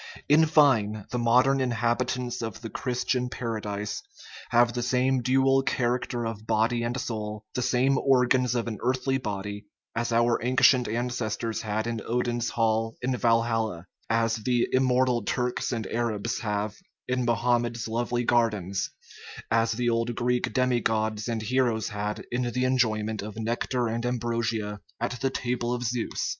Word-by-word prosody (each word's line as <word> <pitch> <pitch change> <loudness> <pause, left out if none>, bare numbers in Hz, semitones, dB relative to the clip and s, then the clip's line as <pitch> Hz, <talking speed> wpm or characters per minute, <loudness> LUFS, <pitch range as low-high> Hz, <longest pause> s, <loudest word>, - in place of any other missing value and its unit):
In 155 +2 +5
fine, 115 -10 +3
the 125 - -1
modern 125 +3 +4
inhabitants 120 +1 -1
of 115 -2 -5
the 115 -2 -7
Christian 125 0 -1
Paradise 105 -4 -4 0.5
have 120 -1 +4
the 120 - -2
same 125 +1 +1
dual 135 +1 +3
character 120 -2 -1
of 110 -1 -5
body 115 +2 +2
and 120 +3 -2
soul, 105 -3 -4
the 125 - -1
same 130 +2 +2
organs 125 -2 +3
of 120 -1 -1
an 110 -4 -4
earthly 130 +2 0
body, 105 -2 -5 0.3
as 120 0 -1
our 115 0 +2
ancient 125 0 +4
ancestors 115 -1 -2
had 110 0 -2
in 115 -1 -3
Odin's 120 0 -1
Hall 115 0 0
in 130 0 +1
Wal 115 -1 +4
halla, 110 -7 -2 0.2
as 115 0 +2
the 120 +2 +1
"immortal" 130 -2 +2
Turks 125 +4 -1
and 115 -4 -2
Arabs 115 0 -2
have 105 -1 -2 0.3
in 125 0 0
Mohammed's 120 -1 +1
lovely 120 +2 -1
gardens, 105 -6 +1 0.6
as 115 0 +3
the 120 +2 -1
old 115 +1 0
Greek 125 +1 0
demi 125 -2 +2
gods 110 -1 0
and 115 -2 -2
heroes 120 -2 +1
had 105 0 -4
in 120 +1 0
the 125 +1 0
enjoyment 110 -4 +1
of 105 +1 -7
nectar 120 +2 -1
and 115 +1 -2
ambrosia 115 -3 -1 0.2
at 120 +1 -3
the 135 - +2
table 120 -2 -2
of 125 0 -2
Zeus. 120 -1 -2
120 Hz, 155 wpm, -27 LUFS, 110-125 Hz, 0.6 s, In